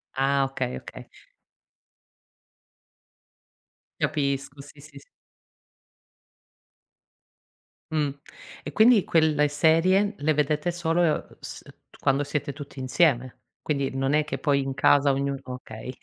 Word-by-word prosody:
Ah 135 +1 +2
okay, 135 - -3
okay. - - -11 2.9
Capisco 140 -1 -2
sì, 145 +1 -15
sì, 145 -1 -14
s - - -20 2.9
Mh. 150 -2 +1 0.5
E - - -6
quindi 220 -2 +5
quelle 155 -2 +2
serie 175 +7 +3
le 155 +2 +1
vedete 150 +3 0
solo 170 -2 0
s - - -8 0.4
quando 135 +1 +1
siete 145 0 -3
tutti 140 -1 -10
insieme. 130 -1 +1 0.2
Quindi 140 -3 -2
non 135 +1 0
è 150 0 +2
che 155 - -4
poi 145 -4 +2
in 135 0 -3
casa 140 +1 +4
ognuno 140 0 -2
okay. 125 -1 -8
145 Hz, 110 wpm, -25 LUFS, 135-155 Hz, 2.9 s, quindi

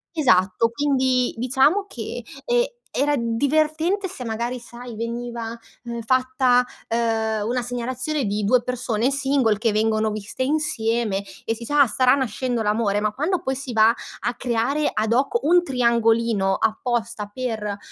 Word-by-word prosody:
Esatto 190 - +3
quindi 260 -1 +1
diciamo 270 - +2
che, - - -6 0.2
ehm, 485 0 +3 0.3
era 290 +2 +2
divertente 310 - 0
se 265 -9 -7
magari 235 +2 -3
sai 240 -1 -10
veniva, 235 0 -4 0.3
ehm, 235 0 -4
fatta, 255 +1 +2 0.2
ehm, 220 -2 0
una 250 +1 0
segnalazione 255 +4 -2
di 205 +1 -1
2 240 +4 +4
persone 245 -1 -1
single 270 -5 +1
che 225 +1 +1
vengono 215 0 +1
viste 215 +4 -4
insieme 235 -8 0 0.2
e 225 - 0
si 230 - -9
sa: 290 +5 0
"Ah, 265 - 0
starà 255 +2 +3
nascendo 250 -2 -1
l'amore". 210 -1 +1
Ma 215 0 -1
quando 330 - -1
poi 265 - -2
si 265 -1 -6
va 220 0 +5 0.3
a 240 - -1
creare 250 +5 0
ad 220 +1 0
hoc 275 - +1
un 350 +3 +4
triangolino 230 - +2
apposta 225 -1 -1
per, 220 -5 -3
240 Hz, 145 wpm, -23 LUFS, 225-265 Hz, 0.3 s, va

